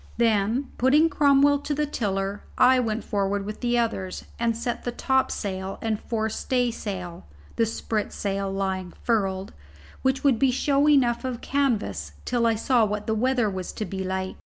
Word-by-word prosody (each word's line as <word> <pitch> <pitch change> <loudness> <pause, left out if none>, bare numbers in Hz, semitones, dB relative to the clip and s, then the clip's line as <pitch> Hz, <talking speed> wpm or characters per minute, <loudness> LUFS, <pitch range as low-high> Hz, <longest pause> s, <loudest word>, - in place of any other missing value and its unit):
Then, 230 +3 +1
putting 295 +6 +5
Cromwell 285 -1 +4
to 290 +1 -3
the 300 +1 +1
tiller, 200 -7 -2 0.2
I 255 0 +6
went 225 -2 -1
forward 200 -1 -1
with 210 +1 -6
the 240 -1 +1
others 220 -6 -2
and 230 -1 +1
set 240 +1 -3
the 245 - -2
topsail 200 -7 -1
and 220 -2 -1
forestaysail 220 -5 -2 0.3
(the 230 - +3
spritsail 200 -3 -2
lying 190 -2 -2
furled), 195 -4 0 0.5
which 265 0 0
would 270 -6 +3
be 270 - +4
show 280 +3 +2
enough 255 -5 +3
of 255 -2 -4
canvas 205 - -1
till 240 -2 +1
I 225 - +2
saw 240 +1 +2
what 210 0 -1
the 220 - 0
weather 245 +1 +2
was 185 -3 -4
to 215 - -4
be 190 +1 -4
like. 190 0 -3
225 Hz, 160 wpm, -25 LUFS, 195-255 Hz, 0.5 s, I